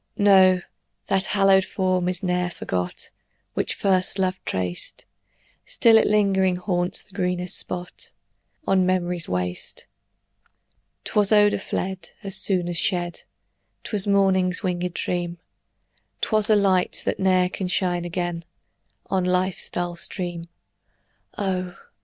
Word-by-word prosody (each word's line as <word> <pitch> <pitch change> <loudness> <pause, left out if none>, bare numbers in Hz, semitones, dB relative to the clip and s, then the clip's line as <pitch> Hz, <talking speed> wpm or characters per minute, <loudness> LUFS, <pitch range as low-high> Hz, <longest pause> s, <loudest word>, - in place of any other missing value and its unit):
No, 190 -3 +5 0.5
that 195 -1 +2
hallowed 195 -1 +4
form 185 -2 0
is 180 +1 -3
ne'er 180 -1 0
forgot 90 - -4 0.4
Which - - -1
first 185 0 +1
love 185 -1 -1
traced; 90 -1 -3 0.6
Still 230 -1 +4
it 220 - +5
lingering 195 -3 +2
haunts 180 -1 -1
the 195 - -17
greenest 180 -2 -1
spot 175 0 -4 0.5
On 190 -5 +3
memory's 180 -2 0
waste. 90 -1 -4 1.2
'Twas 205 -1 +2
odor 205 -1 +4
fled 190 -2 -4
As 195 -1 -2
soon 185 -3 +2
as 175 -1 -2
shed; 175 -2 -1 0.6
'Twas 205 -2 0
morning's 190 -2 +2
winged 180 -1 -1
dream; 175 -1 -2 0.8
'Twas 215 -1 +1
a 215 - +6
light, 190 -3 +2
that - - -1
ne'er 185 -1 +3
can 185 +1 -4
shine 180 -1 0
again 175 -1 -3 0.6
On 190 -1 -1
life's 180 0 0
dull 175 -1 -3
stream: 175 -1 -3 0.9
Oh! 185 -3 -2
185 Hz, 125 wpm, -23 LUFS, 175-195 Hz, 1.2 s, a